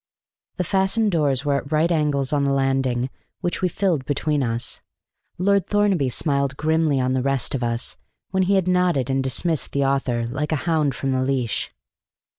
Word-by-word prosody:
The 180 - 0
fastened 195 +4 +1
doors 145 -5 +1
were 140 -1 +2
at 140 +1 -6
right 155 +3 +2
angles 150 -4 0
on 145 -1 +2
the 140 - +1
landing 135 -2 0 0.3
which 175 - -2
we 185 - +2
filled 175 -6 0
between 145 +1 0
us. 115 -1 -2 0.6
Lord 200 0 +2
Thornaby 200 -9 +2
smiled 140 0 -1
grimly 155 -2 +1
on 130 0 +1
the 130 - +1
rest 135 -2 +1
of 130 -2 -1
us, 115 0 -2 0.3
when 190 - +1
he 200 - +4
had 190 -2 +1
nodded 180 -8 +2
and 135 0 +1
dismissed 150 +4 -1
the 140 -1 +1
author 130 -4 0
like 140 +6 -3
a - - +2
hound 155 -5 +1
from 135 +1 -2
the 130 0 +1
leash. 130 -4 -1
140 Hz, 185 wpm, -22 LUFS, 130-170 Hz, 0.6 s, he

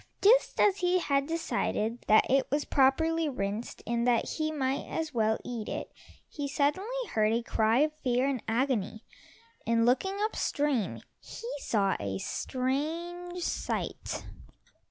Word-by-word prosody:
Just 480 +5 +5
as 400 -2 +4
he 360 0 +2
had 280 -5 +1
decided 245 -8 -1
that 215 - +6
it 270 0 +2
was 290 +2 0
properly 320 +4 +3
rinsed, 210 -2 -4
and 235 0 0
that 235 -2 +3
he 310 -1 -1
might 270 -3 -1
as 320 -2 -3
well 220 -2 +2
eat 235 -3 -4
it, - - -5 0.4
he 290 -2 -4
suddenly 295 +7 0 0.2
heard 215 -1 +2
a 235 +1 0
cry 225 +3 +2
of 305 0 +2
fear 250 0 +2
and 265 -4 -1
agony, 225 -3 0 0.6
and 230 0 +3
looking 385 +11 +2
up 435 - -1
stream, 285 -8 0 0.2
he 465 - -9
saw 200 -7 +1
a 100 -1 -3
strange 335 - -3
sight. - - -3
270 Hz, 145 wpm, -29 LUFS, 230-320 Hz, 0.6 s, that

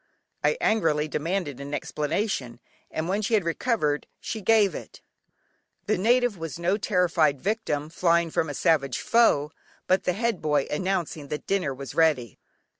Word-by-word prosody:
I 465 - +2
angrily 160 -8 +2
demanded 155 -3 -2
an 140 +1 -4
explanation, 145 - -2 0.3
and 160 +1 -3
when 200 +3 0
she 220 +2 +1
had 205 - +2
recovered, 165 - 0
she 220 - -5
gave 210 -1 +4
it. - - -9 0.9
The 215 - +1
native 235 +1 +2
was 160 -3 -5
no 175 +3 +1
terrified 175 -8 +2
victim, 155 -6 -2
flying 170 0 +2
from 160 - 0
a 145 - -5
savage 140 -7 +2
foe, 165 -11 +3 0.3
but 185 +1 +2
the 180 - +2
head 230 0 -1
boy 150 -3 +1
announcing 170 -3 -2
that 150 +1 -5
dinner 195 -8 0
was 135 0 -7
ready! 150 - +1
165 Hz, 155 wpm, -26 LUFS, 150-200 Hz, 0.9 s, gave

